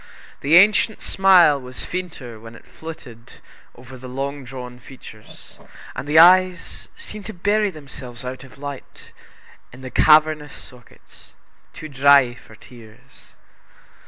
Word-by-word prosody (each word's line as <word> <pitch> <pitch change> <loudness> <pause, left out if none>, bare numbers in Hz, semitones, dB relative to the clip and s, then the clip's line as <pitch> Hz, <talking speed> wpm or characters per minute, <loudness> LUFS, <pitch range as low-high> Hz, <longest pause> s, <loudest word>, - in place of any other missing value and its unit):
The 145 +4 +2
ancient 210 +3 +3
smile 180 -7 +4
was 125 0 -9
fainter 160 -11 -7
when 115 +1 -13
it - - -17
flitted 125 -8 -12 0.4
over 130 +1 -13
the 130 0 -10
long 140 +2 -5
drawn 125 -1 -10
features, 115 -4 -14 0.4
and 140 - -7
the 150 +2 +1
eyes 180 +1 +4
seemed 210 -1 -10
to 220 - -8
bury 205 +3 0
themselves 135 -6 -10
out 130 +1 -7
of 130 - -16
sight 140 -1 -10 0.6
in 125 - -14
the 130 -1 -9
cavernous 155 -1 +3
sockets, 125 -2 -15 0.4
too 155 - -10
dry 140 -3 +4
for 120 -2 -17
tears. 110 -1 -18
140 Hz, 130 wpm, -20 LUFS, 125-165 Hz, 0.6 s, smile